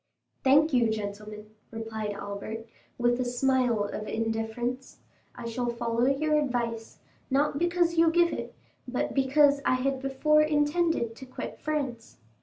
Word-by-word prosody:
"Thank 295 +4 +5
you, 240 -3 +4
gentlemen," 210 0 -5 0.2
replied 220 -2 -4
Albert, 200 +3 -6 0.3
with 240 0 +2
a - - +2
smile 245 -2 +1
of 210 +1 -5
indifference; 225 +3 -3 0.4
"I 245 - -8
shall 240 +1 -2
follow 235 +1 0
your 300 +3 +2
advice—not 255 +2 -2
because 345 -1 +1
you 330 0 +6
give 340 +1 +3
it, - - -6 0.3
but 250 0 -2
because 280 +1 +4
I - - +3
had 265 +1 -1
before 275 +3 +3
intended 300 -4 +1
to 265 - -10
quit 255 - -7
France. 270 -7 -3
250 Hz, 135 wpm, -28 LUFS, 225-290 Hz, 0.4 s, you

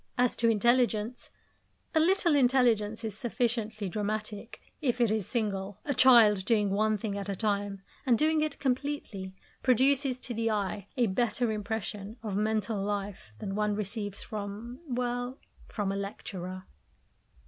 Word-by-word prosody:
As 250 -1 +2
to 230 - +3
intelligence 235 0 +2 0.6
a 320 - +4
little 345 0 +3
intelligence 240 -5 +3
is 220 -3 -3
sufficiently 225 -3 -1
dramatic, 215 +2 -4 0.2
if 250 -4 0
it 235 -3 +3
is 215 -4 -1
single. 200 -4 -2
A 285 - 0
child 230 -7 +7
doing 210 -2 +2
one 215 +2 +2
thing 205 -1 -3
at 200 0 -5
a 200 - -1
time 200 -1 -1 0.2
and 245 -3 +3
doing 310 +2 +3
it 305 -2 -1
completely, 250 -8 -2 0.3
produces 260 +1 +3
to 245 - -4
the 225 0 0
eye 205 -2 -2
a 245 - +4
better 235 +3 0
impression 210 0 -4
of 210 -3 -3
mental 215 0 0
life 200 - -4
than 195 - -4
one 210 0 0
receives 205 -1 -4
from 215 +4 -6
well, 245 0 -2 0.3
from 205 -3 -2
a - - -2
lecturer. 185 -2 -5
220 Hz, 150 wpm, -30 LUFS, 205-245 Hz, 0.6 s, child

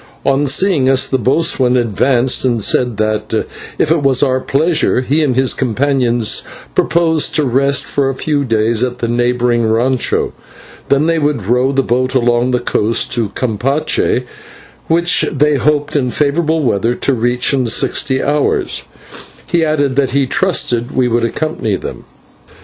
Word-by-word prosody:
On 140 +1 +1
seeing 145 -2 +2
us 135 -1 +2
the 130 - -1
boatswain 130 0 +1
advanced, 125 +2 +1
and 120 -4 0
said 120 -1 +1
that, 110 0 -2 0.5
if 155 - +1
it 165 -2 +2
was 135 -1 +2
our 130 -2 +1
pleasure, 150 0 +1
he 145 +5 0
and 130 -4 0
his 130 0 +2
companions 125 -2 0 0.3
proposed 160 -3 +1
to 155 -2 +2
rest 135 +2 +1
for 140 -1 -1
a 135 - -3
few 145 +1 -1
days 115 -1 +1
at 125 -1 -2
the 120 - -3
neighbouring 120 0 0
/rancho/ 120 +3 0 0.6
and 140 +3 +2
then 165 -1 +1
to 150 +1 +2
row 125 +3 0
the 135 -1 +1
boat 130 +2 -1
along 120 0 +2
the 125 -1 0
coast 115 -1 -1
to 115 -4 -1
Campeche, 125 +2 -1 0.6
which 170 +1 +2
they 150 +1 +1
hoped 145 +2 0
in 130 -4 +1
favourable 155 +4 0
weather 115 0 0
to 140 - -1
reach 120 +2 0
in 130 -3 0
sixty 130 +3 +1
hours, 145 0 -1 0.7
adding 155 -5 +1
that 135 -1 +1
he 140 - +2
trusted 125 -7 0
we 130 -1 +2
would 120 0 0
accompany 115 -4 -2
them. - - -8
130 Hz, 155 wpm, -14 LUFS, 120-145 Hz, 0.7 s, seeing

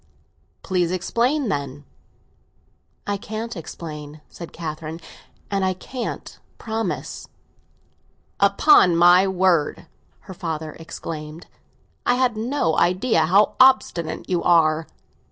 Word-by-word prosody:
"Please 180 -2 0
explain, 235 - 0
then." 140 -3 -4 1.2
"I 205 0 -1
can't 220 +3 -6
explain," 155 -3 -8
said 170 - -10
Catherine. 160 0 -6 0.5
"And 195 -1 0
I 185 -1 0
can't 245 +6 -7 0.2
promise." 225 0 -4 1.1
"Upon 200 - +5
my 175 +3 +6
word," 185 -4 +1 0.4
her 190 - -10
father 160 -3 -5
explained, 160 0 -8 0.6
"I 245 - +2
had 250 -2 +1
no 225 - -1
idea 180 -2 +2
how 200 +5 +4
obstinate 255 -11 +3
you 180 -2 0
are!" 160 -2 +3
180 Hz, 100 wpm, -22 LUFS, 160-215 Hz, 1.2 s, my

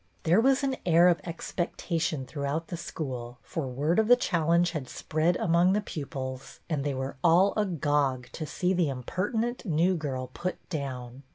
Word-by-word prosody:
There 175 +7 +4
was 270 +3 +3
an 270 -1 0
air 175 +1 +6
of 175 - +2
expectation 165 -3 -2
through 140 +1 -5
out 155 +4 -2
the 175 - -3
school, 125 -7 -5
for 155 -5 -4
word 145 - +1
of 220 - +3
the 245 - +8
challenge 170 -5 +2
had 145 -7 -5
spread 160 +3 0
among 175 +2 +3
the 210 - +2
pupils 135 -7 -6
and 150 -5 -1
they 140 -2 -1
were 130 +1 -4
all 175 +4 +5
agog 145 - +1
to 155 - -5
see 180 +4 0
the 175 -5 +2
impertinent 210 - -2
"new 175 0 +2
girl 130 -5 -4
" - - -29
put 180 +1 -5
down. 130 -5 -5
165 Hz, 180 wpm, -28 LUFS, 140-180 Hz, -, the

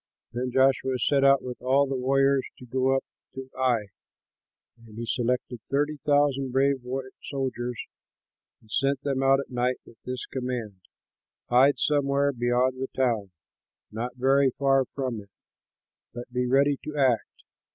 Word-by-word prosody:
Then 125 +1 -2
Joshua 130 0 +2
set 135 +3 +2
out 140 -1 +5
with 125 -1 -7
all 135 +3 +3
the 135 0 -3
warriors 135 +1 +2
to 125 - -12
go 130 +2 +1
up 135 - 0 0.3
to 130 0 -8
Ai. 120 -6 +1 0.9
And 110 -1 -14
he 115 - -4
selected 125 0 -1
thirty 145 +5 -1
thousand 145 -2 +1
brave 135 +1 +2 0.5
soldiers 125 -3 -3 0.8
and 110 - -21
sent 135 +2 +1
them 135 -2 -1
out 135 0 +4
at 135 - -11
night 125 +1 0
with 115 - -18
this 125 -1 -4
command, 125 -7 -5 0.7
"Hide 135 +4 +5
somewhere 140 -1 +1
beyond 125 +1 +1
the 135 - -1
town, 115 -7 +1 0.6
not 120 +3 -4
very 135 +2 +3
far 135 -1 +3
from 125 -4 -4
it, 100 - -18 0.9
but 120 +1 -8
be 125 0 0
ready 140 +2 +3
to 150 -1 -6
act. 130 -5 +1
130 Hz, 150 wpm, -26 LUFS, 125-135 Hz, 0.9 s, out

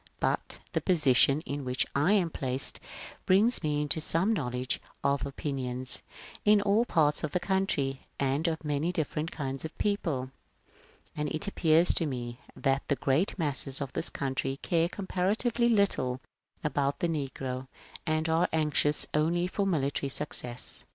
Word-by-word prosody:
But - - -1 0.2
the - - 0
position 145 -4 +4
in 145 -3 -5
which 125 -1 0
I 150 +8 +3
am 180 -6 +2
placed 130 -1 -1 0.5
brings 210 +6 +4
me 150 -2 0
into 150 +2 0
some 180 +7 +3
knowledge 125 - -2 0.2
of 140 0 +1
opinions 130 -2 -2 0.4
in 210 0 +5
all 205 +3 +2
parts 150 -8 +1
of 155 - -3
the 180 - +1
country 175 -8 -1
and 140 +4 0
of 160 -1 -2
many 150 +3 0
different 155 -1 -2
kinds 135 -4 -4
of 160 - -7
people; 155 -11 -1 0.8
and 150 0 -2
it 155 +7 0
appears 165 -3 +3
to 165 - +2
me 120 -2 -5 0.2
that 135 0 +1
the 140 - +1
great 140 +10 0
masses 140 -4 +1
of 140 -3 -5
this - - +2
country 135 0 -2
care 170 0 +1
comparatively 210 +6 0
little 195 - +1 0.4
about 140 -2 0
the 175 - 0
negro, 135 -4 -4 0.4
and 155 0 +1
are 165 +2 +2
anxious 150 -1 +3
only 165 +3 +1
for 195 +2 -1
military 140 -5 -1
successes." 125 -3 +3
150 Hz, 150 wpm, -29 LUFS, 135-175 Hz, 0.8 s, in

